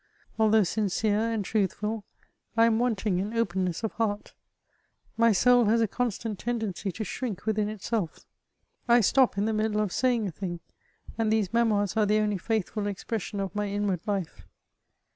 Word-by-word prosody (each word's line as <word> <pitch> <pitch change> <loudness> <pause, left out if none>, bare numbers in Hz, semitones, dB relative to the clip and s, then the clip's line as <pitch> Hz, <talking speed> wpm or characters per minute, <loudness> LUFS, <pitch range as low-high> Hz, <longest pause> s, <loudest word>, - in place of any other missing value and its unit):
Although 220 -1 +5
sincere 215 +3 0
and 215 -3 -2
truthful, 210 +1 -1 0.5
I 230 - +6
am 230 -1 +3
wanting 215 -6 0
in 205 +4 -3
openness 185 -4 -1
of 220 - -1
heart; 210 -2 -2 0.8
my 230 0 +4
soul 245 +4 +5
has 225 +2 +3
a 225 - +3
constant 225 -2 -3
ten 240 0 -2
dency 200 -2 -3
to 220 - -3
shrink 215 0 -5
within 215 -1 0
itself; 215 -3 -3 0.6
I 240 0 +6
stop 250 +1 +3
in 200 - +1
the 220 - 0
middle 215 0 0
of 210 -3 0
saying 245 -4 +1
a - - -4
thing, 175 +1 -5 0.6
and 220 -1 +2
these 220 -2 +1
Memoirs 215 -4 +2
are 215 -2 +3
the 210 +1 +3
only 210 -2 0
faithful 210 0 -2
expression 205 +1 -4
of 195 -1 -3
my 210 0 -1
inwaid 200 -2 -1
life. 195 -5 -3
215 Hz, 170 wpm, -27 LUFS, 200-225 Hz, 0.8 s, I